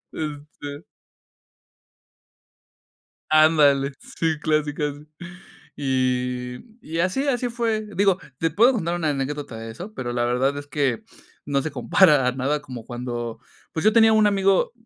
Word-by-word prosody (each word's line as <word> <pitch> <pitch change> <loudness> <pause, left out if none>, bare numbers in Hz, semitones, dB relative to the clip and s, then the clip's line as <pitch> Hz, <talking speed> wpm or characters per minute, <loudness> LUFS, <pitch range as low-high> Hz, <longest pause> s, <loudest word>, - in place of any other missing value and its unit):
Eh, 150 -2 -3 0.2
este 145 +2 -7 2.5
Ándale, 150 -3 +5 0.3
sí, 160 -2 0
clásico 150 -1 0
ese. 145 0 -4 0.7
Y 125 -2 -1 0.2
y 165 +2 -5
así, 185 +11 0
así 245 -2 0
fue. 225 -2 -1
Digo, 195 -1 +3 0.2
te 165 - +1
puedo 230 - +4
contar 175 -6 -1
una 160 -3 0
anécdota 140 -3 -3
de 115 0 -7
eso, 190 - -9
pero 120 -2 -4
la 120 0 0
verdad 130 +4 +1
es 145 - -6
que 135 -4 -1 0.4
no 140 -1 0
se 155 - -4
compara 140 0 +4
nada 135 +3 -1
como 125 -5 -9
cuando 120 -1 -5 0.3
pues, 160 - -3
yo 215 - +5
tenía 225 -1 +6
un 215 -1 +5
amigo, 195 0 +2
150 Hz, 140 wpm, -23 LUFS, 130-180 Hz, 2.5 s, tenía